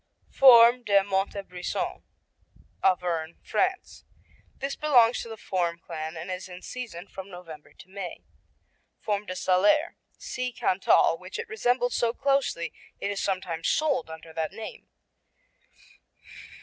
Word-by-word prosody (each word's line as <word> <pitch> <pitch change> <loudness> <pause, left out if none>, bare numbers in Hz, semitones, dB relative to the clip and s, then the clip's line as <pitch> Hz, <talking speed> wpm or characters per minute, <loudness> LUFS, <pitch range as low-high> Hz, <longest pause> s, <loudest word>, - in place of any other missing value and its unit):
Fourme 245 -2 +8
de 200 -3 +4
Montebrison 195 -2 -3 0.8
Auvergne, 175 -3 +1
France 375 0 -1 0.5
This 275 +1 -3
belongs 250 -6 +4
to 230 - -8
the 225 - -7
Fourme 175 -4 -1
clan 160 0 -6
and 170 +4 -6
is 185 +1 -5
in 180 0 -10
season 220 -9 -7
from 190 0 -9
November 165 -5 -11
to - - -15
May. 190 -1 -7 0.8
Fourme 210 -1 -2
de 185 - -4
Salers 205 - +3 0.2
see 255 -1 -4
Cantal, 185 -6 +3
which 185 +1 -8
it - - -5
resembles 245 - 0
so 235 -1 +1
closely 275 -12 0 0.3
it 200 - -2
is 200 - -3
sometimes 185 -4 -2
sold 285 - +1
under 160 0 -10
that 160 -1 -2
name. 225 - -9
195 Hz, 130 wpm, -27 LUFS, 175-245 Hz, 0.8 s, Fourme